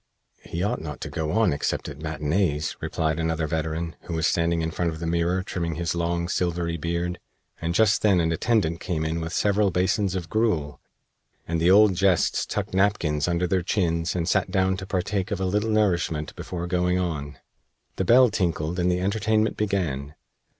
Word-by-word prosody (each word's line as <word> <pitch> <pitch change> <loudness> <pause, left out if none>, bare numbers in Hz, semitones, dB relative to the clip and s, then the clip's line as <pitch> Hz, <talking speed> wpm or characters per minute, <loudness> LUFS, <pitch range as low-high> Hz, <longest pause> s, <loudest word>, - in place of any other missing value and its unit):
"He 85 +2 -4
ought 105 - -1
not 75 -3 -6
to - - -5
go 80 -1 -2
on 110 -5 +3
except 70 - -2
at 75 0 -8
matinees," 75 +1 -1
replied 80 0 -1
another 80 -1 0
veteran, 80 +1 -3
who 85 - -4
was 80 -1 0
standing 85 0 +1
in 80 - -2
front 85 +1 -1
of 80 - -5
the 85 - -4
mirror 85 +2 0
trimming 85 -3 -3
his 85 0 -1
long, 85 0 -1
silvery 85 -1 -1
beard, 85 +2 -2 0.4
and 85 +1 -2
just 110 0 +4
then 100 -4 +4
an 80 -1 +1
attendant 85 -2 +1
came 80 -4 -2
in 80 +1 -2
with 80 0 -4
several 100 +1 +2
basins 95 +1 +1
of 90 -3 -3
gruel, 85 -9 0 0.7
and 85 0 -1
the 85 - +4
old 105 +1 +6
Jests 95 -1 +2
tucked - - -3
napkins 90 -6 +1
under 85 0 +1
their 90 +1 +1
chins 85 -2 0
and 85 -2 -1
sat - - +1
down 95 -1 +1
to 95 - -7
partake 95 +1 -1
of 100 -4 -2
a 95 - 0
little 105 +4 0
nourishment 85 -8 0
before 85 -1 -5
going 90 0 +1
on. 75 -6 -3 0.6
The - - +1
bell 120 +4 +6
tinkled 85 -3 -1
and 90 +1 +2
the 90 - 0
entertainment 110 +2 +1
began. 80 -9 -2
85 Hz, 190 wpm, -25 LUFS, 80-95 Hz, 0.7 s, old